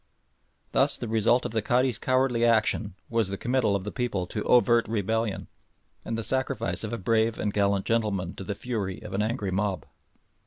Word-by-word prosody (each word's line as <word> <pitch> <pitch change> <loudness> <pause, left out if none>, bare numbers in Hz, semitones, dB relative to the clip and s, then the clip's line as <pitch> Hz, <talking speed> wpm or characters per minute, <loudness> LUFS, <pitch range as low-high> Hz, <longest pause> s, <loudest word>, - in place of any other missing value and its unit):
Thus - - +2
the - - -5
first 110 - -5
result 115 +3 +3
of - - -3
the 110 -1 0
Cadi's 120 +2 +1
cowardly 130 -2 +1
action 110 -3 +2
was 115 -4 0
the 100 - -3
committal 120 -3 +1
of 100 - -2
the 105 - -5
people 115 -8 -2
to 105 +4 -4
overt 120 -1 +4
rebellion, 110 0 -1 0.6
and 115 - -3
the 115 - -3
sacrifice 130 -2 -1
of 110 - -4
a 115 - -2
brave 110 +3 +1
and 105 - -2
gallant 100 -1 +1
gentleman 105 -6 0
to - - -5
the 100 +1 -4
fury 105 -5 -4
of 90 - -8
an 100 - 0
angry 105 -3 -1
mob. 95 -1 -1
110 Hz, 195 wpm, -27 LUFS, 100-120 Hz, 0.6 s, overt